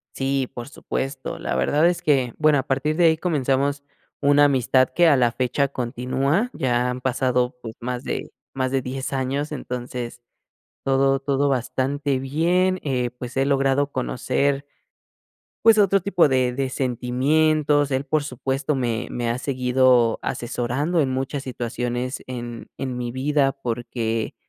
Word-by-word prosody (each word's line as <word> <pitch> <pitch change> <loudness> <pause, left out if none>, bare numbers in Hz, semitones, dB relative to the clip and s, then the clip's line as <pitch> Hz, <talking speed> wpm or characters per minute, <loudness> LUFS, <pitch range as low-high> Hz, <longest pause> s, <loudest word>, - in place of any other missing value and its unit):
Sí, 135 -1 0
por 120 0 -7
supuesto. 135 -2 -4
La - - -3
verdad 145 - +2
es 175 - -1
que, 130 -5 +2
bueno, 155 -2 +4
a 130 - +1
partir 145 +3 0
de 175 - +3
ahí 160 -1 +5
comenzamos 140 -3 0 0.4
una 145 0 +5
amistad 130 -2 +3
que 175 0 +5
a 150 - +6
la 120 -2 +3
fecha 130 +3 0
continúa, 130 - -1
ya 125 -1 0
han 125 0 -4
pasado, 125 -1 0
pues, 115 -1 -8
más 125 +1 -4
de - - -4 0.2
más 130 -1 -2
de 135 -1 +1
10 130 +2 -4
años, 135 +3 -2
entonces 125 -3 -5 0.6
todo 135 0 +2
todo 140 +1 0
bastante 135 +2 -1
bien. 175 +8 +1
Eh, 125 -4 -1
pues 125 +1 -8
he 135 - +3
logrado 140 0 +2
conocer 135 +2 0 1.0
pues, 225 -1 +7
otro 195 -2 +4
tipo 180 -2 +3
de 130 -2 +2
de 135 0 -1
sentimientos. 145 +4 +1
Él, 135 +1 0
por 150 +1 +1
supuesto, 135 +2 -2
me 120 -2 -1
me 120 -1 -2
ha 115 - 0
seguido 125 -3 +2
asesorando 125 +8 -1
en 135 -3 +1
muchas 135 +2 -2
situaciones 125 0 -3
en 120 -2 -7
en 130 -2 -3
mi 120 -1 -3
vida 135 +1 +1
porque, 115 -3 -3
135 Hz, 150 wpm, -23 LUFS, 125-145 Hz, 1.0 s, pues